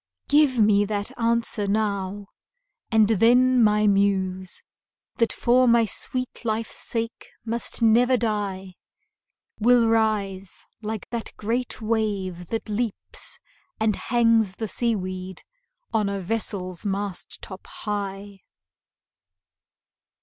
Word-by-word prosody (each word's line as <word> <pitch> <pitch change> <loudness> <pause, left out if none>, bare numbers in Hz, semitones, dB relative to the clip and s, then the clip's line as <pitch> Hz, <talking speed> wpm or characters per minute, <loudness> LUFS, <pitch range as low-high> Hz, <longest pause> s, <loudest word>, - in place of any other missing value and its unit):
Give 290 -3 +4
me 210 -2 +5
that 205 -1 -3
answer 230 -3 0
now, 200 -1 -1 0.7
and 220 -2 +5
then 245 +4 +4
my 210 0 +4
Muse, 190 -2 +1 0.5
That 230 -2 +2
for 250 +1 +3
my 235 -1 +5
sweet 255 +5 -3
life's 225 0 -2
sake 230 0 -4 0.2
must 235 +1 -2
never 245 +3 +5
die, 200 -5 -3 0.8
Will 235 +1 +5
rise 205 -4 0 0.2
like 220 -1 -5
that 235 -2 -4
great 230 +2 -2
wave 200 -6 -1
that 225 +4 -3
leaps 215 0 -3 0.4
and 220 -2 +2
hangs 230 -4 +2
The 220 - -4
sea 235 +2 0
weed 185 -1 -6 0.5
on 215 -3 +2
a 200 0 -2
vessel's 185 -3 -3
mast 200 -2 -3
top 190 -1 -9
high. 200 -1 -5
215 Hz, 110 wpm, -24 LUFS, 195-230 Hz, 0.8 s, me